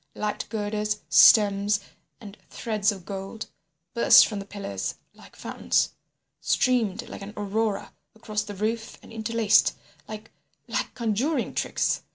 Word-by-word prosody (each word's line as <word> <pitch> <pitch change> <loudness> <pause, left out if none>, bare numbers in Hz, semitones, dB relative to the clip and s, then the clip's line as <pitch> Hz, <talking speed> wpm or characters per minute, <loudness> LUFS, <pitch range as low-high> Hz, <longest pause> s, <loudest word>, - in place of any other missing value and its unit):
Light 210 0 -3
girders, 210 -1 -2
stems 205 -1 +6 0.4
and 205 -2 -11
threads 215 -2 0
of 190 -4 -9
gold, 195 +2 -6 0.5
burst 235 - +7
from 210 -3 -4
the 195 - -7
pillars 195 - -5 0.2
like - - -17
fountains, - - 0 0.5
streamed 240 -3 +1
like - - -9
an 200 +1 -8
Aurora 210 +1 -2 0.2
across 215 -1 -3
the 210 -1 -7
roof 220 +3 -3
and - - -14
interlaced, 220 -1 +2 0.3
like—like 215 +1 -7
conjuring 240 +5 -1
tricks. - - -1
210 Hz, 125 wpm, -25 LUFS, 205-225 Hz, 0.5 s, burst